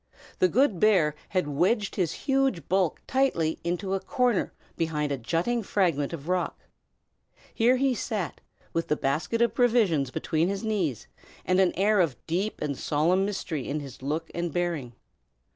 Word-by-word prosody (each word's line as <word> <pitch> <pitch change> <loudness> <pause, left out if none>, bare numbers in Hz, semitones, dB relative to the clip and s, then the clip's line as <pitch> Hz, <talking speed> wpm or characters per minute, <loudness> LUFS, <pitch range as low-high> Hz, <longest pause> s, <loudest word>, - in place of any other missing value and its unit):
The 185 - +5
good 215 - +2
bear 180 -8 +4 0.2
had 180 -3 0
wedged 195 - +1
his 180 -5 0
huge 270 - +1
bulk 185 -3 +1
tightly 240 -12 +1
into 180 +3 -2
a 195 - +1
corner 245 0 0 0.2
behind 150 -3 -1
a 140 - 0
jutting 170 - 0
fragment 170 -9 0
of 160 -3 -7
rock. 180 0 -1 1.0
Here 240 +3 +4
he 265 0 +2
sat, 210 -7 -3 0.3
with 165 - -1
the 150 - +2
basket 155 +13 0
of 235 - +1
provisions 215 - +3
between 160 +5 0
his 195 +2 -3
knees, 190 - -1 0.4
and 185 0 +2
an 185 -2 +4
air 205 +2 +3
of 155 -9 +2
deep 190 +6 -2
and 145 -2 -2
solemn 170 +8 +1
mystery 185 -8 -3
in 150 +2 -1
his 135 -3 -9
look 155 +4 -3
and 170 -1 -2
bearing. 165 -8 -2
180 Hz, 160 wpm, -27 LUFS, 155-210 Hz, 1.0 s, The